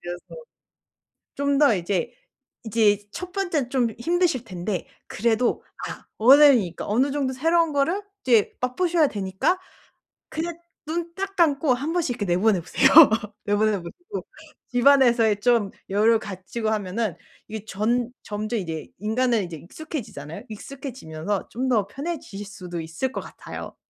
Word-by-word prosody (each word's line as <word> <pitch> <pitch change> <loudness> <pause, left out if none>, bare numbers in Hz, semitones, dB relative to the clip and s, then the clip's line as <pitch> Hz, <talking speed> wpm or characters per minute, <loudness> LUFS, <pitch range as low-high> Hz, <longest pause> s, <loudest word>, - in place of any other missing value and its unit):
그래서 175 0 -7 1.1
좀 280 0 +1
더 280 -7 +5
이제 180 0 -2 0.5
이제 210 -2 +2
1 360 +7 -7
번째는 340 -10 -1
좀 255 -3 +2
힘드실 340 -3 +1
텐데 185 0 -4 0.2
그래도 235 +2 +1 0.3
아 - - -9
어른이니까 250 - +6
어느 255 +7 +2
정도 270 -2 -1
새로운 325 +3 +2
거를 325 +8 +1 0.2
이제 235 -5 +3
맛보셔야 325 +5 +2
되니까 200 - -1 0.7
그냥 330 +1 -4 0.3
눈 335 +1 -3
딱 390 0 -4
감고 295 -5 +3
1 290 +7 -3
번씩 335 -7 0
이렇게 205 - -3
내보내 185 +2 +2
보세요. 265 +10 +3 0.6
내보내 210 +1 +2
보시고. 355 - -8 0.4
집안에서의 245 -5 +4
좀 230 -4 +3 0.2
여유를 220 +3 +4
갖추고 210 +3 -4
하면은 210 -2 -1 0.3
이 220 -2 -6
전 235 +4 0
점점 215 +2 -3
이제 160 -4 -5
인간은 225 +1 +1
이제 165 -2 -7
익숙해지잖아요. 180 - -7
익숙해지면서 210 - -5
좀 260 +3 -2
더 215 -5 +2
편해지실 275 - -6
수도 180 -4 -6
있을 165 +12 -3
것 - - -4
같아요. - - -9
235 Hz, 305 characters per minute, -24 LUFS, 205-285 Hz, 1.1 s, 어른이니까